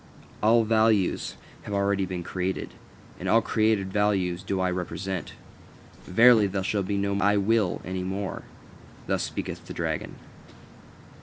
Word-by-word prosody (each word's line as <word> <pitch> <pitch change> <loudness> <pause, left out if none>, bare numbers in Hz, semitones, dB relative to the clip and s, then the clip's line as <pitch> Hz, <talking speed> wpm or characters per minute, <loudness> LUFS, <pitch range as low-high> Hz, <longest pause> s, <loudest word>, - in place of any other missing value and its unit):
All 115 +2 +5
values 110 -3 +2 0.3
have 105 - -5
already 100 -1 +1
been 90 -2 -4
created, 90 +2 -3 0.5
and - - -3
all 115 - +4
created 110 -4 +1
values 95 -4 +1
do 95 0 -2
I 95 0 +1
represent. 90 0 -4 0.7
Verily, 115 +2 +6
there 95 0 -2
shall 100 +1 0
be 100 +1 -2
no 100 0 0
'I 105 +1 +3
will' 105 -1 +1
any 95 0 -3
more." 95 +1 -4 0.6
Thus - - 0
speaketh - - -5
the - - -7
dragon. - - -3
100 Hz, 140 wpm, -26 LUFS, 95-105 Hz, 0.7 s, Verily